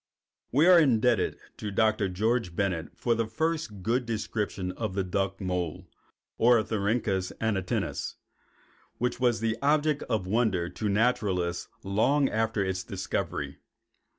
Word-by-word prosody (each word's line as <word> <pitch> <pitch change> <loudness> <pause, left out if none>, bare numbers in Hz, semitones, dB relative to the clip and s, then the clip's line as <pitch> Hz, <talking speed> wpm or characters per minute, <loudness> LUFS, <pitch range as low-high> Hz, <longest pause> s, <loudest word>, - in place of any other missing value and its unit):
We 145 +6 +4
are 180 -1 +8
indebted 120 - +3 0.2
to 105 - -4
Dr. 110 -1 +2
George 105 -1 0
Bennett 90 -4 -2
for 120 - +1
the 115 -1 0
first 150 - -2
good 120 +3 0
description 105 -4 -2
of 95 0 -4
the 100 - +1
duck 95 +1 -1
mole 90 -2 -3 0.5
(Ornithorhynchus 110 -4 +2
anatinus) 100 -5 -1 0.8
which 125 0 -1
was 120 -3 +2
an 110 0 0
object 150 +1 +2
of 110 -6 0
wonder 95 -4 +1
to 105 +2 -3
naturalists 100 -5 +1 0.2
long 130 +9 +2
after 110 -2 0
its 95 -1 -2
discovery. - - -3
110 Hz, 125 wpm, -28 LUFS, 95-120 Hz, 0.8 s, are